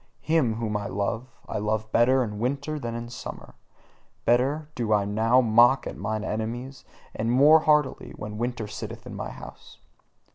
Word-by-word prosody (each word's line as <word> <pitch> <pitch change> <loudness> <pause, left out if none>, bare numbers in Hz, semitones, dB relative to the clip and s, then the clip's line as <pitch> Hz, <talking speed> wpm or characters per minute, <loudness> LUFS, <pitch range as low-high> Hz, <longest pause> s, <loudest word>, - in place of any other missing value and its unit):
Him 155 -9 +2
whom 110 -2 -3
I 105 -1 -2
love, 105 +5 -2 0.2
I 110 - -3
love 110 +1 -2
better 130 +3 +4
in 105 -3 -5
winter 140 +5 -2
than 115 -3 -4
in 120 0 -5
summer; 120 - -8 0.7
better 135 +6 +2
do 115 -5 -2
I 100 -1 +2
now 110 +5 +3
mock 120 +3 +5
at - - -5
mine 110 +1 -3
enemies, 120 +5 -4 0.3
and 115 +2 -1
more 145 +6 +7
heartily, 150 -3 +1
when 105 0 -7
winter 120 -2 -2
sitteth 105 0 -7
in - - -8
my - - -5
house. - - -12
115 Hz, 170 wpm, -26 LUFS, 110-130 Hz, 0.7 s, more